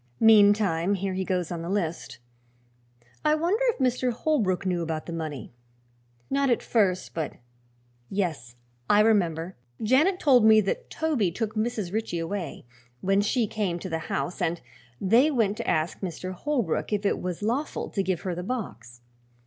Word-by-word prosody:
Meantime, 205 -4 +5
here 195 0 -2
he 190 0 -1
goes 180 -2 -2
on 170 -1 -4
the 170 - -5
list. 175 -5 -2 1.1
I 305 0 +4
wonder 355 +10 +1
if 475 - +1
Mr. 255 -1 +1
Holbrook 225 - 0
knew 180 -2 0
about 160 -1 -3
the 170 - -6
money? 155 -8 -5 0.7
Not 275 0 +1
at 240 - +1
first, 195 -6 +1
but 160 -3 -3 0.8
Yes, 155 -12 -3 0.3
I 205 - +6
remember 185 -5 +1 0.2
Janet 290 - +3
told 255 -6 +5
me 220 0 +7
that 460 - -3
Toby 300 - 0
took 215 +5 -3
Mrs. 215 -4 -2
Ritchie 220 -5 -2
away, 170 -1 -4 0.4
when 195 +1 +2
she 225 +3 +1
came 205 -5 -2
to 185 +2 -6
the 160 -1 -2
house, 180 +2 -3
and 170 -1 0 0.4
they 235 +10 +4
went 225 -8 +1
to - - -5
ask 160 +1 0
Mr. 185 0 -5
Holbrook 240 - -1
if 205 0 -1
it - - +1
was 180 +2 -4
lawful 250 +8 -2
to 200 - 0
give 185 -3 -1
her 185 - -3
the 175 - -4
box. 120 - -6
200 Hz, 165 wpm, -26 LUFS, 175-230 Hz, 1.1 s, me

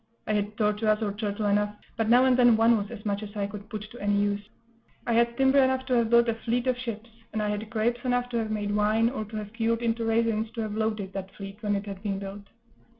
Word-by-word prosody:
I 215 - -1
had 210 0 -1
tortoise 210 0 +2
or 205 -2 -1
turtle 210 0 -3
enough, 205 0 +1 0.2
but 225 -1 0
now 245 +2 +6
and 260 -1 +4
then 245 -3 +6
one 230 +1 +5
was 205 -2 -2
as 225 -3 -9
much 205 0 -1
as 210 0 -8
I 205 -1 -1
could 205 +1 -8
put 215 -3 -5
to 245 - -11
any 205 0 +1
use; 205 0 +1 0.6
I 235 - 0
had 235 +1 +2
timber 270 +1 +4
enough 260 0 +1
to 255 - -1
have 235 -2 +3
built 235 0 +5
a 230 - +2
fleet 235 +2 -2
of 255 -1 +2
ships; 230 -2 -6 0.2
and 220 - -1
I 210 0 0
had 210 +1 -3
grapes 235 +2 0
enough 245 -1 +1
to 240 - -2
have 220 -1 -2
made 205 -1 -1
wine, 215 +3 +3
or 215 -5 -4
to 215 +1 -10
have 210 0 -5
cured 230 0 0
into 230 0 0
raisins, 225 -1 +1
to 230 - -2
have 215 -1 -3
loaded 215 -3 -2
that 195 -1 -6
fleet 195 +1 -9
when 205 -2 0
it 200 +1 -3
had 195 -2 -7
been 200 -2 -2
built. 200 +1 -8
220 Hz, 265 wpm, -27 LUFS, 205-235 Hz, 0.6 s, now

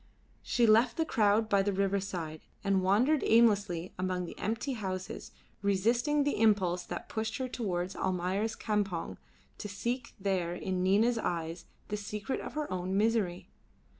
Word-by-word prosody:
She 240 - +2
left 225 +3 +4
the 325 - +2
crowd 215 -4 +3
by 200 -2 +3
the 200 +1 +1
riverside, 190 -5 -2 0.2
and 195 -1 +2
wandered 235 +11 +3
aimlessly 205 -7 +3
among 185 -1 -1
the - - -8
empty 230 +6 -2
houses, 190 -5 -5 0.3
resisting 235 +9 +2
the 290 -5 0
impulse 190 -5 +3
that 175 - -6
pushed 220 0 -3
her 260 - -2
towards 190 -7 -3
Almayer's 190 +4 -1
campong 205 -6 -2 0.4
to 210 - -4
seek 235 +5 -3
there 185 -3 0
in 185 0 -2
Nina's 215 +6 +3
eyes 165 -3 -3 0.2
the 210 - -1
secret 210 +4 -4
of - - -7
her 300 0 -2
own 185 +1 -1
misery. 210 -5 +1
200 Hz, 150 wpm, -31 LUFS, 185-225 Hz, 0.4 s, left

